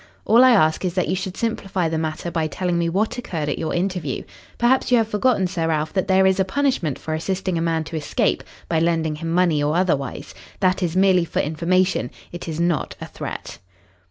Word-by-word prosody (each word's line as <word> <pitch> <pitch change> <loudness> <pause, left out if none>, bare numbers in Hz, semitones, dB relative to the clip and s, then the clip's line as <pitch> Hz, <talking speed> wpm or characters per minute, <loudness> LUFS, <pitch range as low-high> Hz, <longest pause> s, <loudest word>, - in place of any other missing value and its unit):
All 235 +3 +6
I 255 - +7
ask 160 -10 +3
is 180 -1 -2
that 185 - 0
you - - +1
should 185 0 -5
simplify 195 -6 -1
the 160 0 -1
matter 160 +2 -3
by 160 -2 0
telling 175 +2 -1
me 170 0 +1
what 210 +7 -1
occurred 160 -10 -3
at 145 - -2
your 160 - -2
interview. 175 -6 -2 0.3
Perhaps 250 +2 +2
you 245 - +6
have 225 -2 +2
forgotten, 215 -1 +2
Sir 175 -3 -1
Ralph, 155 -1 -1
that 190 0 0
there 190 0 +4
is 190 0 +3
a - - +5
punishment 190 - 0
for 160 - -5
assisting 185 +3 -2
a 165 - 0
man 165 -1 0
to 160 - -8
escape 155 -2 0 0.2
by 165 - +1
lending 160 -2 0
him 165 +1 -4
money 170 -4 +2
or 150 +2 +1
otherwise. 160 -7 -1 0.3
That 185 0 +2
is 175 -2 -1
merely 185 -2 +4
for 170 - -3
information. 170 -3 +1 0.2
It 175 0 -7
is 160 -1 -4
not 170 -2 0
a - - -6
threat." - - -7
175 Hz, 215 wpm, -22 LUFS, 160-190 Hz, 0.3 s, I